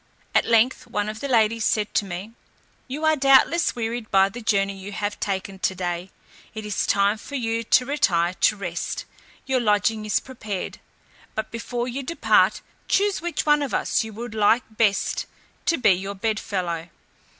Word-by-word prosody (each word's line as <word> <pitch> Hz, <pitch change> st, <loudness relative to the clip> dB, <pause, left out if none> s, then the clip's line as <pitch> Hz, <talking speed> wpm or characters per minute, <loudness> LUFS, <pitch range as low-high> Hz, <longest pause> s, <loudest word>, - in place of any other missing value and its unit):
At -, -, +4 dB
length 230 Hz, +2 st, +2 dB
one 205 Hz, 0 st, -2 dB
of 215 Hz, 0 st, -6 dB
the 280 Hz, -, -3 dB
ladies 230 Hz, -3 st, +2 dB
said 215 Hz, -1 st, 0 dB
to 205 Hz, -, +1 dB
me, 190 Hz, +3 st, -6 dB, 0.6 s
"You 290 Hz, +4 st, -3 dB
are 315 Hz, 0 st, +4 dB
doubtless 275 Hz, +5 st, +4 dB
wearied 230 Hz, -1 st, -3 dB
by 195 Hz, 0 st, +4 dB
the 240 Hz, +4 st, -8 dB
journey 200 Hz, -2 st, +1 dB
you 195 Hz, +1 st, -8 dB
have 205 Hz, 0 st, -3 dB
taken 195 Hz, -1 st, -3 dB
to 190 Hz, -, 0 dB
day; 175 Hz, 0 st, -3 dB, 0.5 s
it 215 Hz, -1 st, -5 dB
is 210 Hz, -2 st, -1 dB
time 200 Hz, +2 st, +2 dB
for 285 Hz, -, -8 dB
you 230 Hz, -3 st, -1 dB
to 250 Hz, +3 st, +3 dB
retire 185 Hz, -, +1 dB
to 200 Hz, -, +2 dB
rest; 175 Hz, -4 st, -4 dB, 0.4 s
your 265 Hz, -1 st, +1 dB
lodging 215 Hz, -1 st, +1 dB
is 210 Hz, -, +2 dB
prepared: 215 Hz, -7 st, -6 dB, 0.6 s
but 220 Hz, -, -3 dB
before 240 Hz, +1 st, -3 dB
you 255 Hz, +3 st, -3 dB
depart 335 Hz, +6 st, +2 dB, 0.3 s
choose 400 Hz, -2 st, +2 dB
which 340 Hz, -2 st, -2 dB
of 295 Hz, -2 st, +2 dB
us -, -, +1 dB
you 220 Hz, -, -7 dB, 0.2 s
like 220 Hz, +2 st, +3 dB
best 215 Hz, -3 st, +1 dB, 0.4 s
to 335 Hz, -, +3 dB
be 245 Hz, -, +4 dB
your 195 Hz, +2 st, -1 dB
bedfellow." 185 Hz, -5 st, -2 dB
215 Hz, 170 wpm, -24 LUFS, 195-250 Hz, 0.6 s, At